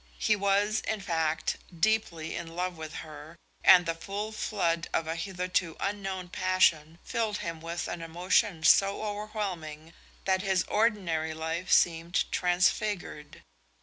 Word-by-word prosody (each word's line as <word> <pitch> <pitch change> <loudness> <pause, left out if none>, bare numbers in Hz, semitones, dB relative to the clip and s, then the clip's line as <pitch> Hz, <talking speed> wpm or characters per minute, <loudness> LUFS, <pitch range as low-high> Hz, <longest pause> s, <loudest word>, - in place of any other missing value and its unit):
He 215 - +2
was, 205 +2 +2
in 220 - -1
fact, 160 -4 -1 0.2
deeply 215 -6 0
in 165 -1 -6
love 180 0 -2
with 160 -1 -8
her, 155 +1 -11 0.3
and 180 -1 +8
the 165 - 0
full 200 +6 -5
flood 170 -6 -1
of 165 - +1
a 160 +1 -3
hitherto 180 -2 -2
unknown 195 -2 -3
passion 170 -4 +2
filled 220 -3 -1
him 165 -1 -5
with 170 +1 -4
an 175 - -5
emotion 175 +2 +1
so 195 +4 +5
overwhelming 195 -7 -5 0.3
that 190 -1 +2
his 190 -2 +1
ordinary 180 -8 0
life 160 +3 -3
seemed 170 0 +3
transfigured. 180 -3 0
180 Hz, 135 wpm, -29 LUFS, 165-200 Hz, 0.3 s, and